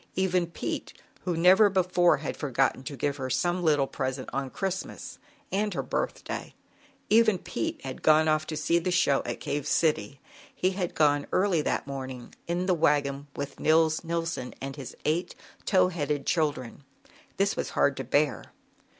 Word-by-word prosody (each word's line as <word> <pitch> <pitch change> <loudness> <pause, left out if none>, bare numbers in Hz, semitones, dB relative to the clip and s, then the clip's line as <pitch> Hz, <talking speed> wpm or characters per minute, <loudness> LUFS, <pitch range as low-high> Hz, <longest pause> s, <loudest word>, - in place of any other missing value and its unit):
Even 185 -2 +1
Pete, 170 - -5 0.3
who 175 -3 -1
never 185 +5 +6
before 180 -2 +3
had 140 +1 -4
forgotten 135 -2 0
to 140 - -6
give 145 0 -1
her 130 -2 -4
some 175 +8 0
little 150 -5 +3
present 130 -1 -4
on 135 0 -2
Christmas 190 +5 -5 0.3
and 205 +2 0
her - - -1
birthday, - - -4 0.6
even 220 -2 +5
Pete 120 - -4
had 130 -1 -6
gone 155 0 +5
off 155 0 +1
to 155 - -4
see 170 +3 +2
the 170 - -2
show 145 -6 +3
at - - -4
Cave 145 -1 -3
City, 140 -6 +1 0.4
he 185 - +1
had 185 -2 -3
gone 145 -2 +3
early 185 -4 +2
that - - -1
morning, 130 -3 -7
in 175 +2 -1
the 185 - +3
wagon 145 -3 +1
with 140 -1 -5
Nils 160 +1 +3
Nilson 165 -6 -3
and 135 0 -5
his 135 -4 -9
eight 165 +4 0 0.3
tow 185 -2 +4
headed 150 -5 -2
children. 145 -6 -1 0.5
This 195 +1 +2
was - - -3
hard 140 - +3
to 135 - -3
bear. 145 +4 +1
155 Hz, 165 wpm, -28 LUFS, 140-180 Hz, 0.6 s, never